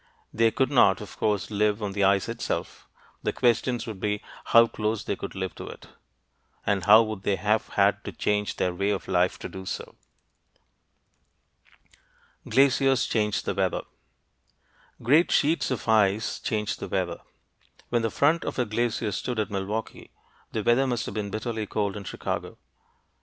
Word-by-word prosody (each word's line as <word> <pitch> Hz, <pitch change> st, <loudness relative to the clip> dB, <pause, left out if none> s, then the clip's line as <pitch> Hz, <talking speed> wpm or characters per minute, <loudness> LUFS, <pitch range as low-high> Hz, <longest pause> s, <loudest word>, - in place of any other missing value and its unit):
They 115 Hz, +1 st, +4 dB
could 130 Hz, +4 st, 0 dB
not, 100 Hz, -8 st, +5 dB
of 105 Hz, -3 st, -9 dB
course, 105 Hz, -1 st, 0 dB
live 105 Hz, 0 st, +1 dB
on 100 Hz, -, -2 dB
the 100 Hz, 0 st, 0 dB
ice 100 Hz, +1 st, +3 dB
itself. 115 Hz, 0 st, -4 dB, 0.3 s
The -, -, 0 dB
questions 120 Hz, 0 st, +1 dB
would 110 Hz, -4 st, -7 dB
be 105 Hz, +1 st, -2 dB, 0.2 s
how 115 Hz, 0 st, +7 dB
close 110 Hz, -1 st, -2 dB
could -, -, -3 dB
they -, -, -7 dB
live 95 Hz, -2 st, -3 dB
to -, -, -9 dB
it, -, -, -11 dB, 0.8 s
and 100 Hz, -1 st, 0 dB
how 110 Hz, +2 st, +8 dB
would 110 Hz, -3 st, -5 dB
they 100 Hz, -, +1 dB
have 105 Hz, +4 st, 0 dB
had -, -, +3 dB
to -, -, -4 dB
change 105 Hz, 0 st, -1 dB
their 90 Hz, -1 st, 0 dB
way 100 Hz, +3 st, -1 dB
of 100 Hz, -2 st, -2 dB
life 90 Hz, 0 st, +1 dB
to -, -, -6 dB
do 95 Hz, 0 st, -8 dB
so. 95 Hz, -, -6 dB, 2.6 s
GLACIERS 135 Hz, +1 st, +4 dB
CHANGE 105 Hz, -2 st, 0 dB
THE -, -, -2 dB
WEATHER 95 Hz, -2 st, 0 dB, 1.2 s
Great 150 Hz, +9 st, +4 dB
sheets 160 Hz, +3 st, +2 dB
of 130 Hz, -3 st, -3 dB
ice 110 Hz, -1 st, +2 dB
change 105 Hz, -2 st, -2 dB
the -, -, -6 dB
weather. 90 Hz, -3 st, -2 dB, 0.7 s
When 120 Hz, -1 st, +1 dB
the 115 Hz, -, 0 dB
front 150 Hz, +8 st, +2 dB
of -, -, -4 dB
a 125 Hz, -, +1 dB
glacier 110 Hz, 0 st, -1 dB
stood 120 Hz, +4 st, -3 dB
at 110 Hz, -1 st, -1 dB
Milwaukee, 100 Hz, +3 st, -4 dB, 0.4 s
the 110 Hz, -, -2 dB
weather 120 Hz, +4 st, +3 dB
must 120 Hz, -3 st, -1 dB
have -, -, -6 dB
been 105 Hz, -2 st, -3 dB
bitterly 110 Hz, 0 st, -3 dB
cold 100 Hz, -1 st, -1 dB
in 100 Hz, -2 st, -7 dB
Chicago. -, -, -4 dB
105 Hz, 170 wpm, -26 LUFS, 100-115 Hz, 2.6 s, how